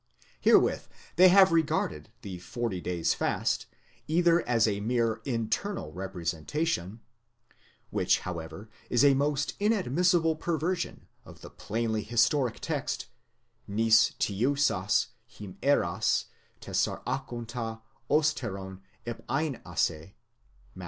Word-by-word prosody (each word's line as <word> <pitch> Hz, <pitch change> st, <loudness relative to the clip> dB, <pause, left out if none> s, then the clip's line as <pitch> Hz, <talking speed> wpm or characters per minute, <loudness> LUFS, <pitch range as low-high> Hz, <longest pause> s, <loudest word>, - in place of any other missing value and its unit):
Herewith -, -, +3 dB, 0.3 s
they 185 Hz, +2 st, +8 dB
have 190 Hz, 0 st, +7 dB
regarded 155 Hz, -, 0 dB
the 95 Hz, -4 st, -6 dB
forty 105 Hz, -1 st, -4 dB
days' 85 Hz, -2 st, 0 dB
fast -, -, -1 dB, 0.4 s
either 170 Hz, +1 st, +3 dB
as 115 Hz, -2 st, +3 dB
a 100 Hz, -2 st, -1 dB
mere 115 Hz, +1 st, 0 dB
internal 115 Hz, -, -2 dB
representation" 90 Hz, -, -3 dB, 0.9 s
(which, -, -, +2 dB
however, 85 Hz, +3 st, -7 dB, 0.2 s
is 120 Hz, +3 st, +4 dB
a 140 Hz, -, +7 dB
most 145 Hz, +1 st, 0 dB
inadmissible 180 Hz, -, +2 dB
perversion 170 Hz, +2 st, -2 dB, 0.2 s
of -, -, -14 dB
the -, -, -11 dB
plainly 110 Hz, 0 st, -2 dB
historic 120 Hz, +3 st, +1 dB
text: -, -, -3 dB, 0.6 s
νηστεύσας 110 Hz, +1 st, +2 dB, 0.3 s
ἡμέρας 100 Hz, -2 st, 0 dB, 0.4 s
τεσσαράκοντα 120 Hz, -3 st, -3 dB, 0.3 s
ὕστερον 100 Hz, -11 st, 0 dB, 0.3 s
éreivace, 95 Hz, -, -2 dB, 0.6 s
Matt. -, -, -13 dB
115 Hz, 90 wpm, -28 LUFS, 95-150 Hz, 0.9 s, they